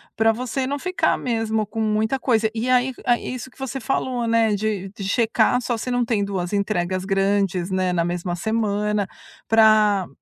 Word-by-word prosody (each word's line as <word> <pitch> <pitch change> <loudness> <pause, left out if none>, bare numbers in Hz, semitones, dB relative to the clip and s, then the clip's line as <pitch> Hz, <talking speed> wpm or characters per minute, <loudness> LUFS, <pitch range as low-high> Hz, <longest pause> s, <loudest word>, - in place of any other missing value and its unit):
pra 225 +1 +4
você 255 +3 -3
não 285 +2 -2
ficar 365 +4 +1
mesmo 225 -2 -1
com 220 +1 -6
muita 220 +4 0
coisa. 225 -4 +2
E 230 +3 -2
aí 255 +1 +3
aí 240 +1 +1
isso 255 +1 -7
o - - -28
que - - -23
você 265 0 -4
falou, 250 -1 -1
né. 225 -2 +3
De 205 -2 -2
de 200 +1 -9
checar 230 +2 +2
só 240 -1 -2
se 250 +3 -4
não 245 0 +1
tem 220 -4 0
2 190 -2 -3
entregas 190 -2 -1
grandes, 195 -2 +1
né, 185 -1 0
na 170 - +1
mesma 175 +1 -2
semana. 210 0 -1 0.4
Pra 215 -4 +4
220 Hz, 190 wpm, -22 LUFS, 200-240 Hz, 0.4 s, pra